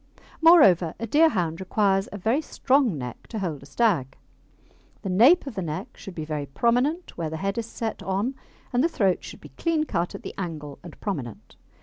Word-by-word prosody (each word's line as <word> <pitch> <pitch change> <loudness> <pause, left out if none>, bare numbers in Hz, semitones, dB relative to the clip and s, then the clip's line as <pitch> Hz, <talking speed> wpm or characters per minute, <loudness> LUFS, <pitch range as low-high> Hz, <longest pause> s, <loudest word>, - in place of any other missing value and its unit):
Moreover, 195 - +6
a 230 - -2
Deerhound 210 - +2
requires 195 0 +1
a 205 - -6
very 225 - +1
strong 265 - +1
neck 125 -2 -7
to 225 - -6
hold 170 -8 -3
a 140 - -13
stag. 145 - +1 0.9
The 190 - -2
nape 260 - +6
of 275 - -6
the 195 - -3
neck 155 -3 -5
should 195 - -10
be 155 - -4
very 150 -2 -4
prominent 245 - 0
where 165 -2 -2
the 160 - -5
head 195 +6 -2
is 230 - -4
set 225 -1 -4
on, 200 +7 -1 0.4
and 245 +2 +3
the 335 - +3
throat 195 - +1
should - - -10
be - - -12
clean 330 -2 +1
cut 180 - -2
at - - -9
the - - -6
angle 155 -6 -6
and 170 -3 -12
prominent. 140 - -5
195 Hz, 200 wpm, -25 LUFS, 165-245 Hz, 0.9 s, Moreover